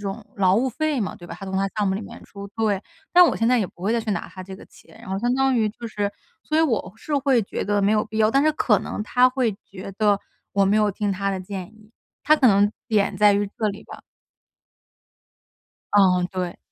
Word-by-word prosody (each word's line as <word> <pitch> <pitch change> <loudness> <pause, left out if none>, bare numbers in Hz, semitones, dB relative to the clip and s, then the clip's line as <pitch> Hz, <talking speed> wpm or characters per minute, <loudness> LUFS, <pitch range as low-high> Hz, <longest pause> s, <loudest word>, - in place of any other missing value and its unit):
种 205 +2 -5
劳 190 -2 +3
务 255 +4 +1
费 300 +3 -1
嘛， 200 - -3
对 175 - -13
吧？ 170 - -7
他 195 - -8
从 190 0 -3
他 195 +1 +1
项 210 -1 +1
目 190 - +1
里 200 - -3
面 210 - -10
出， 200 0 -10
对。 215 -3 0 0.3
但 360 0 +8
我 - - +1
现 225 - 0
在 250 +1 +4
也 - - +1
不 - - -22
会 200 +5 0
再 235 - +1
去 220 -1 -4
拿 - - -3
他 185 - -9
这 190 +1 -9
个 - - -14
钱， - - -19
然 - - -12
后 190 - -2
相 240 +2 +1
当 270 0 +2
于 220 -2 +2
就 235 +2 -8
是 205 -2 -2 0.3
所 310 - -1
以 - - +5
我 225 - 0
是 295 +6 -4
会 270 -3 +2
觉 195 - -4
得 205 0 +1
没 200 +1 +2
有 215 0 +2
必 220 0 -6
要。 215 -1 +4
但 275 +5 +3
是 310 - +4
可 220 -9 +2
能 210 - -5
他 250 +3 +4
会 255 -3 0
觉 190 +1 -9
得， 205 -2 +3 0.3
我 200 0 +2
没 200 +2 +2
有 210 -1 +3
听 200 0 -2
他 195 +1 -2
的 190 - -3
建 185 -1 -6
议， 215 0 -21 0.3
他 305 - +6
可 270 -5 +4
能 200 0 +4 0.2
点 210 -3 +1
在 210 -1 +5
于 200 0 0
这 215 - 0
里 200 0 -7
吧。 - - -11 1.9
哦， 185 -3 +4
对。 180 -2 -4
210 Hz, 270 characters per minute, -23 LUFS, 195-235 Hz, 1.9 s, 但